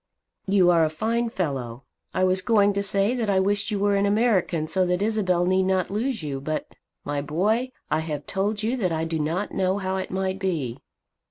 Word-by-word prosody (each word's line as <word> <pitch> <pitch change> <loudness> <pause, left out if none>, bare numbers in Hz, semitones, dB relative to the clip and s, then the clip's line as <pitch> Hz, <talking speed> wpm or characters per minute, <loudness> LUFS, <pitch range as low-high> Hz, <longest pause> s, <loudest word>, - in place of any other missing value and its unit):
"You 190 -2 +4
are 165 -2 +4
a 155 - +2
fine 230 +8 -1
fellow. 135 - -3 0.3
I 185 - 0
was 185 0 +4
going 205 -1 +3
to 200 - 0
say 200 +2 +1
that 235 -4 -1
I 195 -1 +3
wished 205 +2 +1
you 210 - -1
were 200 0 +2
an 200 0 +2
American, 200 -7 +1
so 185 +3 +1
that 180 +2 0
Isabel 190 -5 +1
need 185 +1 +3
not 185 -1 0
lose 225 -1 -2
you. 140 -3 -4
But, 155 +2 -2 0.4
my 145 0 -2
boy, 210 - 0 0.2
I 155 - +2
have 150 -3 -4
told 205 +2 -1
you 230 +4 0
that 185 -7 0
I 160 0 -1
do 165 0 -2
not 165 +7 -1
know 190 +1 +1
how 190 -1 -2
it 190 - -4
might 190 0 -2
be. 155 -11 -2
190 Hz, 210 wpm, -25 LUFS, 165-205 Hz, 0.4 s, You